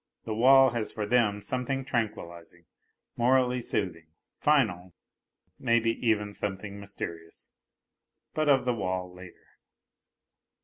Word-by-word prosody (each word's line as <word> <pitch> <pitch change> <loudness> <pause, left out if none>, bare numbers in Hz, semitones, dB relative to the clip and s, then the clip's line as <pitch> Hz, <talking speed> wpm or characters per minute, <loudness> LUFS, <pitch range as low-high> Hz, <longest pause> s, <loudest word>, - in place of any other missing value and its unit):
The 110 - -3
wall 130 +3 +6
has 115 -3 -3
for 105 -2 -3
them 105 -3 +1
something 130 +1 -2
tranquillizing, 85 -8 -4 0.5
morally 125 0 +2
soothing, 85 -8 -3 0.3
final 95 - +1 0.6
maybe 115 -2 +2
even 105 -3 +1
something 100 0 -5
mysterious... 85 -5 -8 0.8
but 155 -1 0
of 135 -3 +4
the 125 - +1
wall 95 -4 -3
later.) 90 -1 -15
110 Hz, 105 wpm, -28 LUFS, 95-125 Hz, 0.8 s, wall